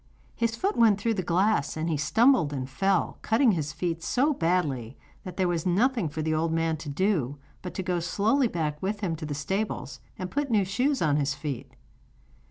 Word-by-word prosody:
his 230 Hz, -1 st, 0 dB
foot 390 Hz, -, -1 dB
went 220 Hz, -4 st, +4 dB
through 225 Hz, +2 st, +1 dB
the 200 Hz, -, -1 dB
glass, 180 Hz, -3 st, +1 dB
and 160 Hz, +1 st, -2 dB
he 165 Hz, -, 0 dB
stumbled 220 Hz, -, +3 dB
and 130 Hz, -3 st, -3 dB
fell, 195 Hz, +8 st, 0 dB
cutting 230 Hz, +2 st, +3 dB
his 155 Hz, -6 st, -2 dB
feet 165 Hz, +1 st, -3 dB
so 270 Hz, -, +2 dB
badly 150 Hz, -, -1 dB, 0.3 s
that 185 Hz, -3 st, -8 dB
there 185 Hz, -2 st, +2 dB
was 170 Hz, -2 st, -1 dB
nothing 205 Hz, -, +1 dB
for 155 Hz, +1 st, -4 dB
the 155 Hz, 0 st, 0 dB
old 160 Hz, +1 st, 0 dB
man 165 Hz, 0 st, +1 dB
to 155 Hz, -1 st, -7 dB
do 145 Hz, -, 0 dB, 0.2 s
but 180 Hz, -, -7 dB
to 190 Hz, -, -2 dB
go 180 Hz, -1 st, 0 dB
slowly 215 Hz, +10 st, +2 dB
back 155 Hz, -6 st, -3 dB
with 205 Hz, +2 st, -2 dB
him 175 Hz, -5 st, -1 dB
to 155 Hz, -1 st, -6 dB
the 145 Hz, -, -3 dB
stables, 195 Hz, +9 st, -3 dB, 0.2 s
and 185 Hz, -1 st, -5 dB
put 290 Hz, -1 st, -1 dB
new 210 Hz, -4 st, +3 dB
shoes 255 Hz, +7 st, 0 dB
on 150 Hz, -2 st, +2 dB
his 140 Hz, -2 st, 0 dB
feet. 145 Hz, -4 st, -6 dB
180 Hz, 205 wpm, -27 LUFS, 155-215 Hz, 0.3 s, went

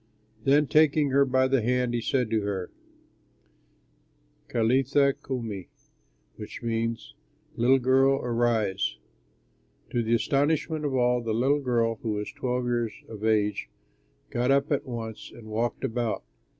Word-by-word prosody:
Then, 145 Hz, +2 st, +4 dB
taking 150 Hz, -1 st, +3 dB
her 140 Hz, +1 st, +4 dB
by 130 Hz, 0 st, +2 dB
the 135 Hz, -2 st, +2 dB
hand, 125 Hz, +1 st, 0 dB
he 120 Hz, -, 0 dB
said 125 Hz, -1 st, 0 dB
to 110 Hz, -1 st, +2 dB
her, 100 Hz, -3 st, -3 dB, 1.8 s
"Talitha 135 Hz, +4 st, +2 dB
koumi," 115 Hz, -8 st, -5 dB, 0.7 s
which -, -, -8 dB
means, 115 Hz, 0 st, -2 dB, 0.4 s
"Little 125 Hz, +3 st, +4 dB
girl, 135 Hz, +1 st, +4 dB
arise." 115 Hz, -, 0 dB, 0.9 s
To 120 Hz, -, +1 dB
the 115 Hz, +1 st, +2 dB
astonishment 150 Hz, +6 st, 0 dB
of 140 Hz, -2 st, -1 dB
all, 125 Hz, -1 st, +2 dB
the 115 Hz, -2 st, -2 dB
little 135 Hz, +5 st, +2 dB
girl 115 Hz, -3 st, 0 dB
(who 110 Hz, -2 st, -2 dB
was 105 Hz, 0 st, -4 dB
twelve 125 Hz, -1 st, -2 dB
years 120 Hz, -3 st, -1 dB, 0.2 s
of 110 Hz, -1 st, -9 dB
age) 105 Hz, -2 st, +1 dB, 0.6 s
got 120 Hz, +1 st, 0 dB
up 140 Hz, +2 st, +2 dB
at 145 Hz, 0 st, 0 dB
once 115 Hz, -3 st, -6 dB
and 115 Hz, -, -12 dB
walked 115 Hz, +2 st, -2 dB
about. 115 Hz, -1 st, -2 dB
120 Hz, 135 wpm, -27 LUFS, 115-135 Hz, 1.8 s, Then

